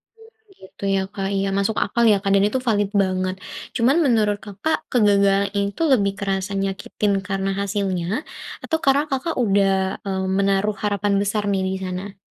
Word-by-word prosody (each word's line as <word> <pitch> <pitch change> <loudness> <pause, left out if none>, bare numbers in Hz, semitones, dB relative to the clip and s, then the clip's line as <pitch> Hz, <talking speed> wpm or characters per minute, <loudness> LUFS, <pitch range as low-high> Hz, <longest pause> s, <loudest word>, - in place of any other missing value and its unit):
Oh 450 - -18 0.3
gitu 190 - -14
ya, 195 - +1
Kak. 195 -1 -3
Iya 195 0 0
masuk 200 +2 0
akal 235 - 0
ya, 205 - +4
Kak, 195 -1 -1
dan 200 - +4
itu 260 +5 -1
valid 205 -3 +2
banget. 185 0 -1 0.4
Cuman 255 +5 +3
menurut 215 -5 +2
Kakak, 210 +10 -2
kegagalan 200 -4 +3
ini 200 0 +1
itu 330 - -2
lebih 200 -5 +2
kerasa 195 0 -2
nyakitin 195 +1 -1
karena 195 0 -1
hasilnya, 195 -3 -1 0.6
atau 320 - 0
karena 275 +2 +4
Kakak 270 +5 -1
udah, 195 -2 +3 0.3
mmm, 190 -1 -2
menaruh 200 +1 +1
harapan 205 0 0
besar 205 +1 -1
nih 195 -1 0
di - - -3
sana? 185 +2 -5
200 Hz, 170 wpm, -22 LUFS, 195-210 Hz, 0.6 s, ya